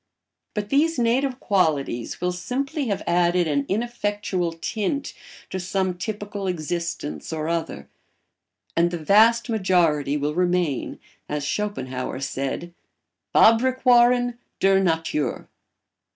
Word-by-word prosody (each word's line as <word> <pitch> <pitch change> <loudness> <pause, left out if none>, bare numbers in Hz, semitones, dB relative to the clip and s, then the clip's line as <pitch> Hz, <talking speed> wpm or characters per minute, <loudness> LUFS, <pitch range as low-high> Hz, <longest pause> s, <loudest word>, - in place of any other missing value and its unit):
But 210 -1 -3
these 310 +3 +2
native 250 +2 +1
qualities 150 - 0
will 180 0 0
simply 260 - -3
have 200 -3 -2
added 175 0 +2
an 140 -2 0
ineffectual 205 -5 -1
tint 215 +10 -3 0.4
to 190 - -3
some 185 0 -1
typical 205 +1 -5
existence 170 -3 -3
or 155 -1 -3
other; 165 - -3 0.9
and 170 +1 +3
the 175 - -3
vast 220 +8 +4
majority 175 - +2
will 145 +1 -1
remain, 175 -5 0 0.3
as 150 -1 -2
Schopenhauer 130 -11 -3
said, 135 +5 -4 0.6
Fabrikwaaren 245 0 +4 0.2
der 195 0 +4
Natur. 165 -4 -1
180 Hz, 110 wpm, -24 LUFS, 160-225 Hz, 0.9 s, vast